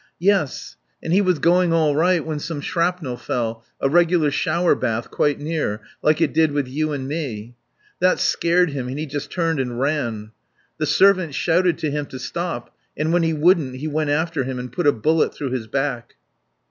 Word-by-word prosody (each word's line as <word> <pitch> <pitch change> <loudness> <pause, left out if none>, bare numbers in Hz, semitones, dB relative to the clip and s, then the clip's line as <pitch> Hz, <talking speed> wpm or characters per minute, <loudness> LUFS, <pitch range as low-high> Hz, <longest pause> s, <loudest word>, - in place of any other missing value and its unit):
"Yes. 185 -5 0 0.3
And 165 - -1
he 195 - +5
was 185 -4 +2
going 175 +2 +3
all 155 -3 +2
right 170 +1 +2
when 155 -2 -3
some 150 0 -5
shrapnel 170 -4 -1
fell 115 -2 -3 0.2
a - - +1
regular 170 0 +3
shower 170 +4 +2
bath, 115 -2 -2
quite 145 -1 +1
near, 145 -8 -2 0.2
like 155 0 +3
it - - +1
did 160 -2 +3
with 145 -3 -1
you 155 +4 -2
and 135 -2 -4
me. 125 -7 -5 0.5
That 185 +1 +3
scared 175 -1 +2
him 135 -3 -4
and 130 +2 -5
he 155 - -3
just 145 0 -5
turned 165 -4 -1
and 125 -2 -3
ran. 120 -7 -2 0.5
The - - 0
servant 185 -6 +3
shouted 170 +2 +2
to 155 - -2
him 145 0 -3
to 130 - -8
stop, 170 -1 -5 0.2
and 155 +2 0
when 175 - +3
he 165 -1 +1
wouldn't 155 -4 +2
he 140 +4 -5
went 155 0 -1
after 160 0 0
him 130 0 -4
and 125 -1 -6
put 150 +5 -1
a - - +7
bullet 155 +7 +1
through 140 -3 -4
his 125 -4 -3
back." 125 -1 -3
150 Hz, 200 wpm, -21 LUFS, 130-170 Hz, 0.5 s, a